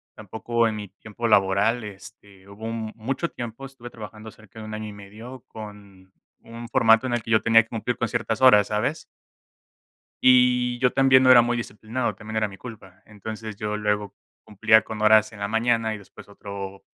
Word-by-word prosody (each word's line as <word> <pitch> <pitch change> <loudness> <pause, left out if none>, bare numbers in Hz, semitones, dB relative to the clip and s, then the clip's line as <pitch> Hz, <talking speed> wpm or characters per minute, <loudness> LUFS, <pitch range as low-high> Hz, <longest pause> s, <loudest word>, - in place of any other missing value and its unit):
Tampoco 115 +2 -1
en 110 - -3
mi 105 -1 -7
tiempo 110 +4 -6
laboral, 105 +3 +2
este, 100 -1 -13
hubo 100 +2 -10
un 115 -1 -4
mucho 135 +9 -3
tiempo, 120 +2 -8
estuve 130 -3 -11
trabajando 110 -1 -11
cerca 110 0 -16
de 110 - -8
un 110 - -8
año 110 0 -5
y 105 - -9
medio 110 +6 -12
con 100 -3 -12 0.3
un 115 +1 -10
formato 115 +1 +4
en 125 - -2
el 120 - 0
que 115 - -7
yo 110 - +4
tenía 115 0 +5
que 115 - -26
cumplir 120 +2 -3
con 120 - -1
ciertas 115 0 -3
horas, 105 -6 +6
¿sabes? 120 +9 -2 1.2
Y 125 -1 +4
yo 125 -1 +2
también 130 -1 +4
no 130 - +6
era 120 -2 +8
muy 120 +1 -1
disciplinado, 120 +1 -4
también 110 0 -9
era 110 -1 0
mi 95 - -12
culpa. 100 -6 -12
Entonces, 110 +1 -8
yo 105 +1 -4
luego 105 -1 -2 0.3
cumplía 110 +1 +3
con 110 -1 -7
horas 110 0 +5
en 110 - -13
la 100 - -2
mañana 115 0 0
y - - -8
después 100 - -15
otro, 100 -1 -9
110 Hz, 195 wpm, -24 LUFS, 105-120 Hz, 1.2 s, era